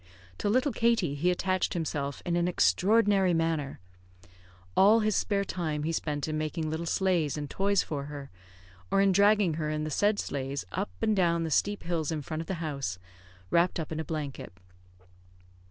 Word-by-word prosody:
To -, -, 0 dB
little 255 Hz, +6 st, +2 dB
Katie 230 Hz, -, +1 dB
he 155 Hz, +5 st, +1 dB
attached 185 Hz, +1 st, 0 dB
himself 145 Hz, -4 st, -3 dB
in 175 Hz, -, 0 dB
an 175 Hz, 0 st, +1 dB
extraordinary 190 Hz, -, +3 dB
manner. 165 Hz, -4 st, -1 dB, 1.0 s
All 215 Hz, +4 st, +6 dB
his 215 Hz, -2 st, +1 dB
spare 200 Hz, -1 st, +1 dB
time 155 Hz, -6 st, -3 dB
he 160 Hz, -, -1 dB
spent 150 Hz, -3 st, -2 dB
in 155 Hz, 0 st, -2 dB
making 155 Hz, +1 st, -2 dB
little 165 Hz, +2 st, -3 dB
sleighs 170 Hz, -6 st, +1 dB
and 145 Hz, -1 st, -4 dB
toys 200 Hz, +5 st, +1 dB
for 140 Hz, -3 st, -4 dB
her, 145 Hz, -1 st, -8 dB, 0.6 s
or -, -, +2 dB
in 195 Hz, 0 st, +4 dB
dragging 200 Hz, -2 st, +4 dB
her 150 Hz, -, -1 dB
in 155 Hz, 0 st, -2 dB
the 155 Hz, -, -4 dB
said 205 Hz, +7 st, +2 dB
sleighs 135 Hz, -3 st, -3 dB
up -, -, -2 dB
and 215 Hz, -, +3 dB
down 170 Hz, -3 st, +2 dB
the 160 Hz, -, -3 dB
steep 205 Hz, +6 st, +1 dB
hills 165 Hz, -3 st, -1 dB
in 155 Hz, -2 st, -3 dB
front 155 Hz, +2 st, -4 dB
of 165 Hz, -, -8 dB
the 190 Hz, -, -2 dB
house, 140 Hz, -12 st, -3 dB, 0.5 s
wrapped 170 Hz, +1 st, +2 dB
up 160 Hz, -, -5 dB
in 160 Hz, -, -3 dB
a -, -, -1 dB
blanket. 150 Hz, -3 st, -5 dB
165 Hz, 185 wpm, -29 LUFS, 150-195 Hz, 1.0 s, All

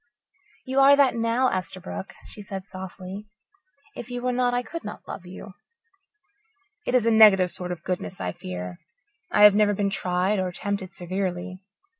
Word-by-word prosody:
"You 265 Hz, 0 st, 0 dB
are 275 Hz, +1 st, +8 dB
that 280 Hz, -2 st, +4 dB
now, 230 Hz, +3 st, +2 dB
Esterbrook," 165 Hz, -, -5 dB
she 210 Hz, -, -11 dB
said 195 Hz, -2 st, -6 dB
softly. 190 Hz, +2 st, -8 dB, 0.7 s
"If 240 Hz, -, -8 dB
you 245 Hz, 0 st, -5 dB
were 250 Hz, -, +1 dB
not, 245 Hz, 0 st, +1 dB
I 245 Hz, 0 st, 0 dB
could 335 Hz, +8 st, -7 dB
not 210 Hz, -, -8 dB
love 180 Hz, -, -8 dB
you." 190 Hz, +2 st, -10 dB, 1.3 s
"It 250 Hz, -, +1 dB
is 245 Hz, -3 st, +3 dB
a 230 Hz, -, +4 dB
negative 200 Hz, -5 st, +7 dB
sort 180 Hz, -1 st, -6 dB
of 175 Hz, -2 st, -6 dB
goodness, 185 Hz, 0 st, -4 dB
I 90 Hz, -, -2 dB
fear. 90 Hz, 0 st, -7 dB, 0.5 s
I 210 Hz, -, +4 dB
have 210 Hz, -1 st, +10 dB
never 205 Hz, 0 st, +3 dB
been 200 Hz, 0 st, 0 dB
tried 185 Hz, +2 st, 0 dB
or 185 Hz, -1 st, -1 dB
tempted 190 Hz, +1 st, -4 dB
severely. 185 Hz, 0 st, -4 dB
195 Hz, 170 wpm, -25 LUFS, 180-230 Hz, 1.3 s, have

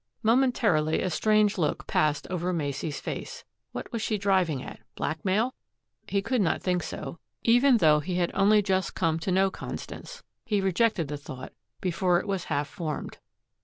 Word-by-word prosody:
Momentarily, 220 Hz, -10 st, +3 dB
a 185 Hz, -, -1 dB
strange 210 Hz, +3 st, +3 dB
look 155 Hz, -3 st, 0 dB
passed 150 Hz, -2 st, +1 dB
over 180 Hz, 0 st, -1 dB
Macey's 145 Hz, -2 st, -2 dB
face. 485 Hz, 0 st, -6 dB, 0.3 s
What -, -, -6 dB
was 230 Hz, -3 st, -3 dB
she 215 Hz, -1 st, 0 dB
driving 185 Hz, -8 st, +1 dB
at -, -, -9 dB, 0.2 s
blackmail? 195 Hz, +10 st, 0 dB, 0.5 s
He 200 Hz, -1 st, 0 dB
could 250 Hz, +1 st, +1 dB
not 175 Hz, -, +1 dB
think 180 Hz, -1 st, +1 dB
so, 170 Hz, -, -6 dB, 0.2 s
even 245 Hz, +2 st, +5 dB
though 155 Hz, -6 st, +5 dB
he 175 Hz, +4 st, -3 dB
had 175 Hz, -1 st, +1 dB
only 205 Hz, +1 st, +4 dB
just 190 Hz, -1 st, 0 dB
come 165 Hz, -2 st, +1 dB
to 185 Hz, -, -2 dB
know 190 Hz, +1 st, +3 dB
Constance. 485 Hz, -, -8 dB, 0.2 s
He 215 Hz, -5 st, 0 dB
rejected 190 Hz, -2 st, +1 dB
the 145 Hz, +1 st, -4 dB
thought 130 Hz, -2 st, -9 dB, 0.3 s
before 180 Hz, -1 st, +2 dB
it -, -, -6 dB
was 195 Hz, -3 st, -2 dB
half 145 Hz, -1 st, -1 dB
formed. 155 Hz, +4 st, -5 dB
185 Hz, 165 wpm, -27 LUFS, 160-215 Hz, 0.5 s, even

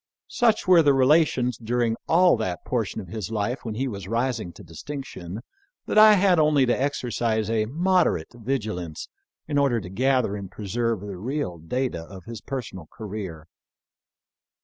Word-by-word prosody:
Such 225 Hz, -4 st, +2 dB
were 180 Hz, -2 st, +7 dB
our 145 Hz, -, +5 dB
relations 130 Hz, -3 st, +3 dB
during 120 Hz, 0 st, 0 dB
all 180 Hz, +2 st, +5 dB
that 95 Hz, -6 st, -4 dB
portion 115 Hz, -4 st, -2 dB
of 95 Hz, -, -12 dB
his 105 Hz, 0 st, -5 dB
life 110 Hz, +4 st, -2 dB
when 110 Hz, -2 st, -4 dB
he 135 Hz, +4 st, -1 dB
was 100 Hz, -6 st, -6 dB
rising 115 Hz, -3 st, -1 dB
to 105 Hz, -, -13 dB
distinction, 95 Hz, -, -7 dB, 0.4 s
that 215 Hz, -, +3 dB
I 215 Hz, 0 st, +9 dB
had 190 Hz, -3 st, +4 dB
only 150 Hz, -3 st, +4 dB
to 120 Hz, -, +2 dB
exer 135 Hz, -2 st, -2 dB
cise 110 Hz, -2 st, 0 dB
a 110 Hz, -1 st, +1 dB
moderate 170 Hz, -, +1 dB
vigilance 110 Hz, -, -4 dB, 0.4 s
in 145 Hz, -2 st, +1 dB
order 135 Hz, -5 st, +2 dB
to 90 Hz, -, -8 dB
gather 125 Hz, 0 st, +1 dB
and 100 Hz, -2 st, -7 dB
preserve 115 Hz, +1 st, -2 dB
the 100 Hz, -2 st, -7 dB
real 120 Hz, -, -3 dB
data 120 Hz, +3 st, -2 dB
of 95 Hz, +1 st, -11 dB
his 115 Hz, -2 st, -8 dB
personal 110 Hz, -, -6 dB
career. 95 Hz, -7 st, -7 dB
115 Hz, 165 wpm, -25 LUFS, 100-135 Hz, 0.4 s, I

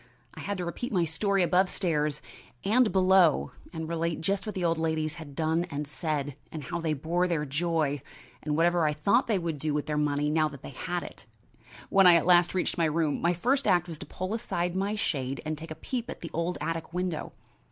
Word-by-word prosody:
I -, -, -11 dB
had 200 Hz, -1 st, -3 dB
to 180 Hz, -, -3 dB
repeat 170 Hz, +8 st, -4 dB
my 180 Hz, -5 st, +2 dB
story 195 Hz, +4 st, +1 dB
above 180 Hz, +2 st, +3 dB
stairs 150 Hz, -7 st, -1 dB, 0.4 s
and 225 Hz, +3 st, +4 dB
below, 185 Hz, -4 st, +4 dB, 0.2 s
and 160 Hz, -2 st, -5 dB
relate 165 Hz, 0 st, -1 dB
just 195 Hz, +5 st, -1 dB
what 210 Hz, -, -4 dB
the 180 Hz, -2 st, -1 dB
old 165 Hz, -1 st, +1 dB
ladies 160 Hz, -1 st, 0 dB
had 145 Hz, -3 st, -10 dB
done 160 Hz, +2 st, +1 dB
and 150 Hz, -1 st, -3 dB
said, 145 Hz, -2 st, -3 dB, 0.2 s
and 155 Hz, -2 st, -6 dB
how 175 Hz, +2 st, -4 dB
they 160 Hz, -2 st, 0 dB
bore 170 Hz, +5 st, 0 dB
their 160 Hz, -4 st, 0 dB
joy, 150 Hz, -1 st, 0 dB, 0.4 s
and 150 Hz, 0 st, -1 dB
whatever 170 Hz, -1 st, +3 dB
I 150 Hz, -, +1 dB
thought 200 Hz, -, +2 dB
they 220 Hz, -4 st, +2 dB
would 165 Hz, -4 st, -3 dB
do 150 Hz, 0 st, -1 dB
with 150 Hz, -, -1 dB
their 150 Hz, -1 st, -2 dB
money 150 Hz, 0 st, +1 dB
now 155 Hz, 0 st, +3 dB
they 140 Hz, -3 st, -10 dB
had 175 Hz, +6 st, -3 dB
it. -, -, -11 dB, 0.6 s
When 195 Hz, -1 st, +6 dB
I 175 Hz, -, +9 dB
at 170 Hz, -, +3 dB
last 175 Hz, 0 st, +5 dB
reached 180 Hz, -1 st, 0 dB
my 165 Hz, -, +4 dB
room, 155 Hz, -1 st, 0 dB
my 175 Hz, +1 st, +3 dB
first 260 Hz, +9 st, +1 dB
act 175 Hz, -3 st, +3 dB
was 160 Hz, -3 st, -7 dB
to -, -, -8 dB
pull 185 Hz, +3 st, -4 dB
aside 180 Hz, -5 st, -2 dB
my 200 Hz, +3 st, 0 dB
shade 135 Hz, -9 st, -2 dB
and 155 Hz, 0 st, -1 dB
take 160 Hz, +2 st, -9 dB
a 155 Hz, -, -6 dB
peep 240 Hz, +9 st, -4 dB
at -, -, -7 dB
the 165 Hz, -, -6 dB
old 170 Hz, +2 st, -1 dB
attic 165 Hz, +1 st, -3 dB
window. 180 Hz, -3 st, -2 dB
165 Hz, 225 wpm, -28 LUFS, 155-180 Hz, 0.6 s, I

